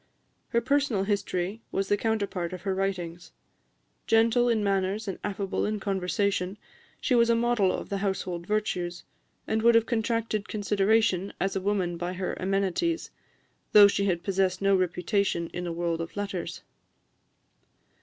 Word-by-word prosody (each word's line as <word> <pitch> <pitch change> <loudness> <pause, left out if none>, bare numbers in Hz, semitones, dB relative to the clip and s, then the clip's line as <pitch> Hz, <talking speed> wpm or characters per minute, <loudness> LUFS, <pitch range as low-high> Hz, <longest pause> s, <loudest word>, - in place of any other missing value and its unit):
Her 235 - +2
personal 275 -5 +1
history 200 0 -2
was 195 0 -1
the 205 - +3
counterpart 200 -5 -2
of 180 - -7
her 195 -1 0
writings. 180 -3 -3 0.7
Gentle 230 +2 +4
in 220 -3 +2
manners 195 +2 0
and 195 - -4
affable 200 -1 -2
in 215 0 -1
conversation, 195 0 -1 0.4
she 260 - 0
was 235 -1 +4
a 235 - +5
model 230 -5 +2
of - - -5
the 200 - -2
household 185 -3 -3
virtues, 180 -5 -2 0.4
and 220 0 0
would 235 +1 +5
have 230 0 +4
attracted 225 -2 -1
consideration 205 -1 +1
as 195 +1 -1
a 195 - -1
woman 185 -3 0
by 175 +1 -3
her 185 0 -3
amenities, 195 - 0 0.6
though 205 -1 +10
she 200 0 0
had 175 -3 0
possessed 190 -1 +1
no 195 0 +3
reputation 180 -1 0
in 175 0 -4
the 170 - -3
world 170 0 -1
of 165 - -7
letters. 190 -4 -4
195 Hz, 155 wpm, -27 LUFS, 185-220 Hz, 0.7 s, though